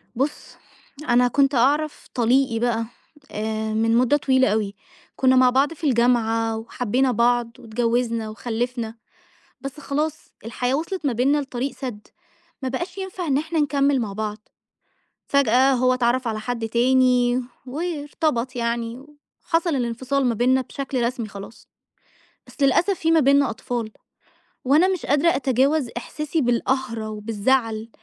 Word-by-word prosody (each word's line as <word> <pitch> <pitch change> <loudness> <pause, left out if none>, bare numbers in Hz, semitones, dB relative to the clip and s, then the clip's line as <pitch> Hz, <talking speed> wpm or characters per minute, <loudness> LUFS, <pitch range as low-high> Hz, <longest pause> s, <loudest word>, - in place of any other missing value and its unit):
بُص، 275 +5 -3 0.5
أنا 245 +1 +5
كنت 275 +3 +2
أعرَف 290 +5 +1
طليقي 245 0 +2
بقى 230 -1 0 0.5
آآ 220 0 -3
من 225 +1 +2
مدة 255 +4 +3
طويلة 260 -2 +3
أوي، 210 -2 -1 0.4
كنا 260 0 +3
مع 255 -1 +6
بعض 270 +5 +2
في 330 - -18
الجامعة، 230 -3 +2
وحبينا 245 +3 0
بعض، 240 0 +2
واتجوزنا 230 0 -1
وخلّفنا، 230 0 -3 0.7
بس 275 +2 -7
خلاص 300 +2 -3 0.2
الحياة 245 +3 -2
وِصلت 325 +2 -3
ما 270 - +2
بيننا 265 +5 +2
لطريق 270 -1 -3
سد، 235 -6 -7 0.5
ما 260 - -1
بقاش 345 +9 -4
ينفع 380 -2 -5
إن 275 -3 +2
إحنا 320 +2 -2
نكمّل 280 -2 +2
مع 215 -4 -3
بعض، 215 +1 -5 0.8
فجأة 270 -1 +4
هو 255 0 +3
اتعرّف 250 0 +1
على 215 -1 -3
حد 230 0 -3
تاني 250 +1 +3 0.2
وارتبط 290 -3 -2
يعني، 235 +1 -3 0.4
وحصَل 330 -2 +1
الانفصال 255 +3 -1
ما 240 - +1
بيننا 255 +4 +3
بشكل 265 -1 -4
رسمي 235 -2 -2
خلاص، 200 +3 -11 0.8
بس - - -8
للأسف 275 +8 +3
في 325 - +1
ما 325 -1 +5
بيننا 280 0 +4
أطفال، 240 -4 -4 0.7
وأنا 300 +8 +4
مش 375 -3 -2
قادرة 290 +4 +3
أتجاوز 270 +2 +1
إحساسي 300 +5 -3
بالقهرة 240 -3 -1
وبالزعل 220 +1 -1
250 Hz, 135 wpm, -23 LUFS, 230-280 Hz, 0.8 s, مع